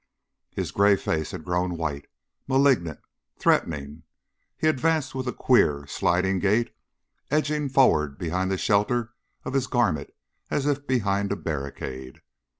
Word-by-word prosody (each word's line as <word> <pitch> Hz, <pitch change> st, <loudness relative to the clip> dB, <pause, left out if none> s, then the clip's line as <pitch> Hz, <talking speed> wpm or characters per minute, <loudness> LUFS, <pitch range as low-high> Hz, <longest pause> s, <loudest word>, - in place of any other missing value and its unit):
His -, -, -4 dB
gray 100 Hz, 0 st, +4 dB
face 80 Hz, -5 st, -2 dB
had -, -, -7 dB
grown 90 Hz, 0 st, -1 dB
white, 75 Hz, -4 st, -3 dB, 0.4 s
malignant, 130 Hz, -, +2 dB, 0.4 s
threatening; 75 Hz, 0 st, 0 dB, 0.6 s
he -, -, -2 dB
advanced 155 Hz, -1 st, +1 dB
with 130 Hz, -1 st, -4 dB
a -, -, 0 dB
queer, 75 Hz, -, +2 dB
sidling 90 Hz, +6 st, +1 dB
gait, 105 Hz, +5 st, +1 dB, 0.6 s
edging 150 Hz, -1 st, 0 dB
forward 75 Hz, -, +3 dB
behind 90 Hz, +3 st, -1 dB
the 95 Hz, -, 0 dB
shelter 110 Hz, +5 st, +1 dB, 0.3 s
of -, -, -4 dB
his 135 Hz, -1 st, +1 dB
garment 100 Hz, -, 0 dB, 0.4 s
as 140 Hz, -, -1 dB
if 145 Hz, -1 st, -1 dB
behind 100 Hz, -5 st, 0 dB
a -, -, +1 dB
barricade. 70 Hz, -5 st, -6 dB
100 Hz, 135 wpm, -25 LUFS, 80-130 Hz, 0.6 s, gray